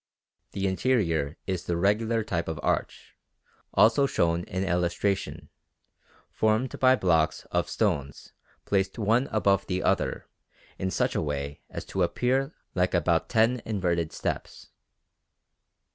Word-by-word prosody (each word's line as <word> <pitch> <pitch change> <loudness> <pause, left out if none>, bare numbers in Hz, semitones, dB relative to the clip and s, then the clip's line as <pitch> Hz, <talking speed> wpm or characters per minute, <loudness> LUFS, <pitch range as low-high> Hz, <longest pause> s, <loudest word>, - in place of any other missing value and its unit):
The 100 - -2
interior 95 - +1
is 95 -3 -3
the 85 - -1
regular 110 +5 +1
type 85 -6 -2
of 80 -2 -4
arch, - - -2 0.6
also 115 +6 +5
shown 85 -6 +1
in 95 +1 -3
the - - -3
illustration, 90 +3 -1 0.8
formed 110 +4 0
by 130 0 +6
blocks 80 -8 +1
of - - 0
stones 70 -1 -2 0.3
placed 95 +1 0
one 115 +4 +2
above 100 -3 +2
the 90 0 -1
other - - 0 0.5
in 95 - -1
such 90 - 0
a - - 0
way 70 -1 -4
as - - -6
to - - -3
appear 135 +3 +1 0.2
like 90 0 +1
about 85 -1 +1
ten 115 +1 +3
inverted 85 -6 -1
steps. - - -5
95 Hz, 130 wpm, -27 LUFS, 85-110 Hz, 0.8 s, by